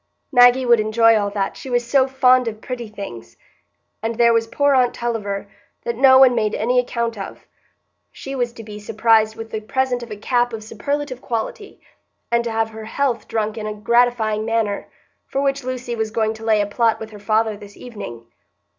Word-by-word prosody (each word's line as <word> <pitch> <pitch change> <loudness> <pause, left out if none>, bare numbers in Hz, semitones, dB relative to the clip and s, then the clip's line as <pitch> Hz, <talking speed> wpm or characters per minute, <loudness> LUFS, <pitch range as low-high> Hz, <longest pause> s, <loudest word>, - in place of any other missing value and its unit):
Maggie 245 0 +6
would 240 -2 +5
enjoy 225 +1 +4
all 205 -2 +1
that, 200 -1 -2
she 265 - -9
was 245 -1 0
so 260 +2 +3
found 255 -2 +4
of 215 -1 -4
pretty 240 -1 -6
things! 195 - -9 0.6
And 225 +1 -2
there 235 0 +4
was 230 0 +1
poor 285 +4 +2
aunt 250 -2 +3
Tulliver, 205 -4 -3 0.4
that 235 - -2
no 260 +2 +6
one 260 -1 +7
made 215 -3 0
any 245 +3 +2
account 235 -3 -2
of, 195 - -8 0.7
she 270 - -8
was 245 -3 -1
to 225 - -10
be 210 -1 -9
surprised 220 0 +2
with 225 0 -8
the 220 - -2
present 250 +2 -1
of 235 - -8
a 210 - -6
cap 245 +2 0
of 220 -1 -6
superlative 260 +4 -4
quality, 260 - -5 0.5
and 235 0 +2
to 235 - -3
have 225 0 -1
her 220 0 -9
health 240 -1 -1
drunk 220 0 -2
in 215 - -4
a 210 - -4
gratifying 225 -1 +2
manner, 220 -2 -1 0.4
for 270 - -2
which 275 -1 0
Lucy 250 -1 -4
was 220 -1 -2
going 220 0 0
to 220 0 -12
lay 220 -2 +3
a - - +1
plot 225 +2 +1
with 220 0 -8
her 210 - -11
father 215 +1 +1
this 205 -1 -13
evening. 160 - -9
230 Hz, 200 wpm, -20 LUFS, 215-245 Hz, 0.7 s, one